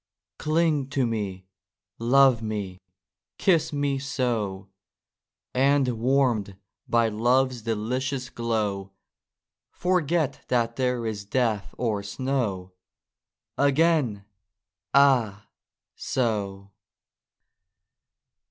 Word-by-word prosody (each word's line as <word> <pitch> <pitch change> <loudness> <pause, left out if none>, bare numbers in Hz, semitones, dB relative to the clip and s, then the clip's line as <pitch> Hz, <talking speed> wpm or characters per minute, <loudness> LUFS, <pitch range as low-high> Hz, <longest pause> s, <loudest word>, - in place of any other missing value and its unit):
Cling 155 -3 +1
to 135 -2 +1
me! 100 -5 -3 0.5
Love 130 0 +4
me! 105 -4 -4 0.6
Kiss 165 -4 +2
me, 145 -2 -1
so! 115 -8 -2 0.9
And 135 +1 +3
warm'd 120 -4 +1 0.3
by 115 -1 +3
Love's 120 +3 +1
delicious 125 +4 -2
glow 105 -4 -2 0.8
Forget 170 -4 0
that 115 -2 0
there 125 -2 -1
is 105 -3 -3
Death 110 -1 -1
or 110 -5 -1
Snow! 100 -4 -2 0.9
Again! 140 -7 +2 0.7
ah! 125 -7 +3 0.5
so 100 -5 -2
120 Hz, 80 wpm, -25 LUFS, 105-135 Hz, 0.9 s, Love